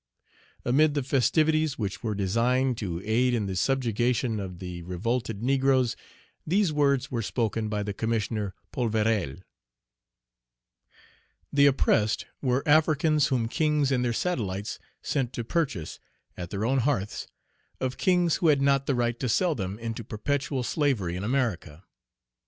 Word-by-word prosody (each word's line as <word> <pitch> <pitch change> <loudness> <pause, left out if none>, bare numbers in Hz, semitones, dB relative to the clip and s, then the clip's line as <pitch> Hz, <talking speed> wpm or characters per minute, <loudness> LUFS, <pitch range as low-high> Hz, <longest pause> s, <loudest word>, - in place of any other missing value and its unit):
Amid 145 +5 +3
the 145 - 0
festivities 155 +3 +2
which 100 -4 -3
were 110 -3 -2
designed 120 +6 +1
to 90 -4 -4
aid 120 +3 +2
in 110 -3 -1
the 95 -1 -3
subjugation 120 0 0
of 95 -3 -6
the 90 -1 -7
revolted 110 +5 -3
negroes, 130 -2 +2 0.5
these 180 0 +1
words 140 -2 +1
were 120 -2 -1
spoken 110 -1 -1
by 105 -1 -1
the 100 0 -3
Commissioner 105 -2 -2 0.2
Polverel: 110 - 0 2.1
"The 140 0 +6
oppressed 110 -5 +2 0.2
were 130 0 0
Africans 155 0 +4
whom 120 -4 0
kings 150 +1 +1
and 125 -2 +1
their 120 - +1
satellites 105 - -2 0.2
sent 130 -4 -1
to 120 - -3
purchase, 130 - -2 0.4
at 85 -1 -6
their 100 +2 -2
own 135 +3 +2
hearths, 115 -6 -1 0.5
of 130 -1 -2
kings 180 -3 +3
who 170 - +1
had 145 -3 +5
not 140 0 +2
the 140 - +2
right 120 -1 0
to 125 - -1
sell 175 +8 +2
them 95 -5 -4
into 115 0 -5
perpetual 135 +5 -2
slavery 120 - 0
in 90 - -4
America. 105 - -2
120 Hz, 145 wpm, -27 LUFS, 105-140 Hz, 2.1 s, The